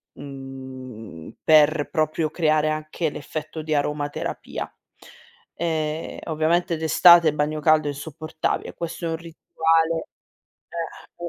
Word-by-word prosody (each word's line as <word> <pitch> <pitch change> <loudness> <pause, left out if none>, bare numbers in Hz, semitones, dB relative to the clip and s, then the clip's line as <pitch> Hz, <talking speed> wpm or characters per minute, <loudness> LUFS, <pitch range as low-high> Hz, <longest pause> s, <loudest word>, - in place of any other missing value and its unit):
mhmm, 130 - -9
per 155 -1 +5
proprio 155 0 0
creare 155 -2 +2
anche 155 +1 -2
l'effetto 155 +2 -6
di 155 0 -2
aromaterapia. 145 0 -2 0.9
Ehm, 160 -1 -2
ovviamente 165 +2 +1
d'estate 165 +1 +7
il 150 - -3
bagno 150 +1 0
caldo 155 0 +4
è - - 0
insopportabile. 155 +2 -4
Questo 170 0 -5
è - - -1
un 160 - -1
rituale, 165 0 0 1.1
ehm, 175 0 -5
155 Hz, 110 wpm, -24 LUFS, 145-160 Hz, 1.1 s, d'estate